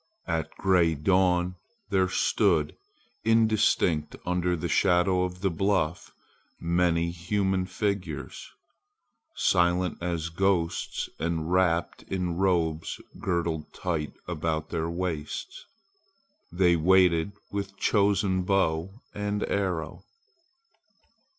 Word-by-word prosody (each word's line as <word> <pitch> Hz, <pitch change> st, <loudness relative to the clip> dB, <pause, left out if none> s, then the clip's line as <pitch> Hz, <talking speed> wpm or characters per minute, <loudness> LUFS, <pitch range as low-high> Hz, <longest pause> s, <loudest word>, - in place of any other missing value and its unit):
At 80 Hz, -1 st, -2 dB
gray 90 Hz, -4 st, +3 dB
dawn 90 Hz, +2 st, +2 dB, 0.3 s
there 95 Hz, -1 st, +2 dB
stood 75 Hz, -4 st, +2 dB, 0.5 s
indistinct 110 Hz, -8 st, +2 dB
under 90 Hz, 0 st, 0 dB
the 80 Hz, -, -3 dB
shadow 90 Hz, 0 st, +3 dB
of 90 Hz, 0 st, -7 dB
the 95 Hz, -2 st, +1 dB
bluff 90 Hz, -2 st, 0 dB, 0.5 s
many 85 Hz, 0 st, +1 dB
human 95 Hz, +2 st, -1 dB
figures; 100 Hz, -2 st, -3 dB, 0.9 s
silent 90 Hz, 0 st, +2 dB
as 85 Hz, -2 st, -2 dB
ghosts 85 Hz, -1 st, 0 dB
and 80 Hz, 0 st, -2 dB
wrapped 90 Hz, -2 st, +1 dB
in 90 Hz, -3 st, -3 dB
robes 85 Hz, -4 st, 0 dB, 0.2 s
girdled 85 Hz, -4 st, -2 dB
tight 80 Hz, -5 st, -3 dB
about 80 Hz, -2 st, -2 dB
their 80 Hz, -1 st, -1 dB
waists, 90 Hz, -, -4 dB, 0.8 s
they 90 Hz, 0 st, +3 dB
waited 90 Hz, +1 st, +3 dB, 0.2 s
with 100 Hz, -1 st, -4 dB
chosen 100 Hz, -2 st, +2 dB
bow 95 Hz, +1 st, 0 dB
and 105 Hz, 0 st, -2 dB
arrow. 90 Hz, -5 st, -2 dB
90 Hz, 95 wpm, -27 LUFS, 85-95 Hz, 0.9 s, gray